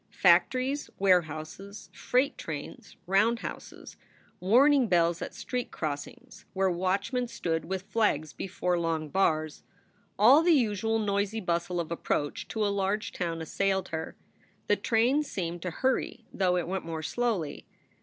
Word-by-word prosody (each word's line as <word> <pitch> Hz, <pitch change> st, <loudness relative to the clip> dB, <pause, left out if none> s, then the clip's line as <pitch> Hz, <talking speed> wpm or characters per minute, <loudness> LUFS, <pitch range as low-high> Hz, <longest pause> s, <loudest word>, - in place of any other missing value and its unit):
Factories, 265 Hz, +3 st, +3 dB
warehouses, 185 Hz, +2 st, -1 dB
freight 255 Hz, +3 st, +1 dB
trains, -, -, -8 dB
roundhouses, 215 Hz, +5 st, -1 dB, 0.4 s
warning 255 Hz, +7 st, +5 dB
bells 170 Hz, -2 st, +2 dB
at -, -, -6 dB
street 250 Hz, -1 st, -4 dB
crossings 145 Hz, -3 st, -6 dB
where 190 Hz, -1 st, +1 dB
watchmen 195 Hz, +8 st, -1 dB
stood 165 Hz, -8 st, -2 dB
with 190 Hz, +2 st, -3 dB
flags 195 Hz, -8 st, 0 dB
before 180 Hz, -1 st, -2 dB
long 160 Hz, -2 st, -2 dB
bars, 155 Hz, -4 st, 0 dB, 0.6 s
all 250 Hz, +9 st, +7 dB
the 340 Hz, 0 st, +4 dB
usual 225 Hz, -3 st, +1 dB
noisy 205 Hz, 0 st, -1 dB
bustle 175 Hz, -2 st, -1 dB
of 165 Hz, -1 st, -4 dB
approach 145 Hz, -3 st, -2 dB
to 220 Hz, -1 st, -1 dB
a -, -, +2 dB
large 200 Hz, +2 st, -1 dB
town 165 Hz, -2 st, -3 dB
assailed 190 Hz, +3 st, -1 dB
her. 160 Hz, -1 st, -5 dB, 0.5 s
The -, -, +3 dB
train 245 Hz, +5 st, +2 dB
seemed 175 Hz, -, -4 dB
to 180 Hz, -, -3 dB
hurry, 250 Hz, +2 st, -1 dB
though 180 Hz, -2 st, +1 dB
it 175 Hz, -, -2 dB
went 190 Hz, +1 st, -3 dB
more 160 Hz, -1 st, -5 dB
slowly. 210 Hz, -9 st, -2 dB
190 Hz, 135 wpm, -28 LUFS, 170-225 Hz, 0.6 s, all